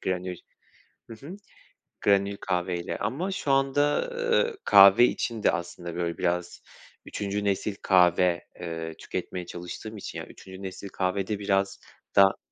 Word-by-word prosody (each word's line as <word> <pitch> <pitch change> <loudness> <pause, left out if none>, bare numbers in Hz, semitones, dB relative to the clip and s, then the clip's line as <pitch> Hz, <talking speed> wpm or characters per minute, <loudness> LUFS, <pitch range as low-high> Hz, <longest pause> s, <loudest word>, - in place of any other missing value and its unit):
granül, 90 -1 -3 0.7
hı - - -6
hı, 185 - -8 0.7
granül 100 0 +2
kahveyle 90 -1 -2
ama 145 - -2
şu 150 -7 -2
anda, 145 - +2
eee, 475 -1 +1
kahve 100 +4 +8
için 115 -3 -2
de - - +5
aslında, 85 0 -5
böyle, 85 -1 -2
biraz, 90 0 -2 0.4
3'üncü 100 0 -3
nesil 100 +1 -1
kahve, 90 -2 +3
eee, 80 -2 -5
tüketmeye 90 +1 -5
çalıştığım 90 +6 -8
için, 100 - -7
yani, - - -8
3'üncü 95 0 -12
nesil 95 +1 -7
kahvede 95 +2 -2
biraz 100 -1 0 0.4
da 95 -1 +6
95 Hz, 135 wpm, -27 LUFS, 90-110 Hz, 0.7 s, kahve